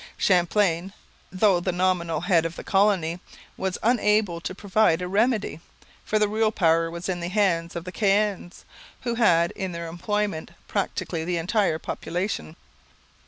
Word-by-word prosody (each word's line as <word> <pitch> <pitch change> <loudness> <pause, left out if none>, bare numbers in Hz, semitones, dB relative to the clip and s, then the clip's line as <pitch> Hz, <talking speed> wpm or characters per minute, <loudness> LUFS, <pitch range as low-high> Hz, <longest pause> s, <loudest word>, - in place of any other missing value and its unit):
Champlain, 180 0 +2 0.4
though 190 -1 +3
the 185 +1 -1
nominal 180 -2 0
head 175 -2 +3
of 165 0 -4
the - - -8
colony, 190 -4 +2 0.4
was 190 -1 -2
unable 210 -6 +2
to 185 - -5
provide 200 -3 +2
a 180 - -3
remedy, 210 -3 +1 0.4
for 215 - 0
the 210 0 +3
real 215 +1 +1
power 165 -4 +2
was 170 +2 -6
in 185 -2 -2
the 170 - -3
hands 175 -4 0
of 170 - -4
the 180 - -7
Caens, 200 -3 0 0.4
who 240 -2 -2
had 170 -8 +3
in 190 -2 -5
their 170 0 -5
employment 175 0 -3
practically 185 -4 -2
the 175 +1 -1
entire 180 0 +1
population. 175 - -4
185 Hz, 155 wpm, -25 LUFS, 170-210 Hz, 0.4 s, though